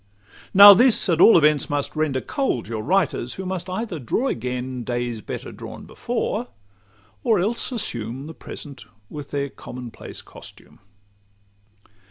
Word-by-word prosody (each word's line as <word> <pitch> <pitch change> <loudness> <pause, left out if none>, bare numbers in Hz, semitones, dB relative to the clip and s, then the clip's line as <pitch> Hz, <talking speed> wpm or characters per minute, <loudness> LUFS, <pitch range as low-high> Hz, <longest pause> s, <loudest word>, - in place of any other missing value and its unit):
Now 200 +1 +11
this 235 +2 +4
at 170 -1 +2
all 230 - +8
events 150 -3 +3
must 145 +1 -2
render 150 -4 0
cold 265 - -2
Your 110 -1 -4
writers, 160 - 0
who 190 - -6
must 185 -1 -4
either 185 -3 -4
draw 225 - -1
again 125 0 -4
Days 120 -2 -3
better - - -7
drawn - - -10
before, - - -3 0.8
or 225 - +3
else 220 +8 -1
assume 125 - -4
The 160 - -8
present, 140 -8 -10 0.3
with 145 -2 -8
their 140 -1 -2
common 125 -2 -9
place - - -9
costume. - - -14
150 Hz, 145 wpm, -22 LUFS, 125-190 Hz, 0.8 s, Now